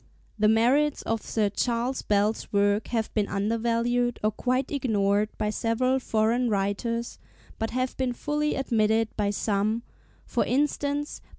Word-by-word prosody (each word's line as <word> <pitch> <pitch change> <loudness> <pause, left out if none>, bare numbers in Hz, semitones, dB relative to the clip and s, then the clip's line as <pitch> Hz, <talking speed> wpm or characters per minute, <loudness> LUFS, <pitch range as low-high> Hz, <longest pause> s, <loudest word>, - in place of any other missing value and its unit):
The 210 - +4
merits 255 +7 +3
of 225 -1 -1
Sir 210 -3 0
C. 245 - +1 0.4
Bell's 210 +1 +1
work 205 +1 +2
have 225 -2 -2
been 210 -2 +1
undervalued 230 +3 0
or 215 - +3
quite 255 +4 -1
ignored 210 -6 +1
by 210 - -1
several 255 +4 +1
foreign 230 +1 +1
writers, 215 +4 -2 0.4
but 225 - -1
have 255 +1 -2
been 255 -2 0
fully 300 +3 -1
admitted 225 -3 +1
by 205 -1 0
some, 210 +2 0 0.4
for - - 0
instance 290 +1 -1
by - - -30
M. - - -31
225 Hz, 150 wpm, -26 LUFS, 210-255 Hz, 0.4 s, The